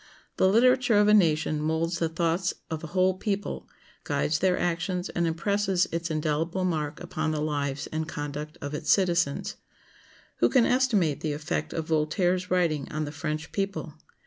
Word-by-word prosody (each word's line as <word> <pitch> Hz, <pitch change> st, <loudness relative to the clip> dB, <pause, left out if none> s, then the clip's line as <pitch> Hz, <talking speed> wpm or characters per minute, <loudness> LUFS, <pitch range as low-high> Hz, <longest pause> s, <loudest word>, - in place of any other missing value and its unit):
The -, -, +4 dB
literature 245 Hz, +1 st, +4 dB
of 205 Hz, 0 st, +5 dB
a 210 Hz, -, +6 dB
nation 155 Hz, -5 st, +3 dB
molds 165 Hz, +2 st, -1 dB
the 165 Hz, -, +1 dB
thoughts 170 Hz, +2 st, 0 dB, 0.2 s
of 160 Hz, 0 st, -4 dB
a -, -, -4 dB
whole 185 Hz, +3 st, +2 dB
people, 205 Hz, -2 st, -3 dB, 0.3 s
guides 155 Hz, 0 st, 0 dB
their 185 Hz, -1 st, +2 dB
actions, 175 Hz, +2 st, -1 dB
and 170 Hz, -1 st, 0 dB
impresses 190 Hz, +2 st, +1 dB
its 170 Hz, 0 st, -2 dB
indelible 160 Hz, +4 st, -1 dB
mark 155 Hz, -4 st, -2 dB
upon 155 Hz, 0 st, -3 dB
the 155 Hz, -1 st, -1 dB
lives 145 Hz, -2 st, -2 dB
and 155 Hz, 0 st, -2 dB
conduct 150 Hz, 0 st, -5 dB
of 145 Hz, +1 st, -4 dB
its 150 Hz, 0 st, 0 dB
citizens. 175 Hz, -7 st, +1 dB, 0.8 s
Who -, -, +3 dB
can 255 Hz, -4 st, +4 dB
estimate 220 Hz, -, +2 dB
the 155 Hz, -2 st, -1 dB
effect 150 Hz, +1 st, -3 dB
of 160 Hz, -, -3 dB
Voltaire's 175 Hz, +4 st, +1 dB
writings 165 Hz, -6 st, +1 dB
on 155 Hz, +1 st, -2 dB
the 145 Hz, -, -6 dB
French 155 Hz, +1 st, -4 dB
people? 195 Hz, -5 st, -3 dB
165 Hz, 170 wpm, -27 LUFS, 155-185 Hz, 0.8 s, a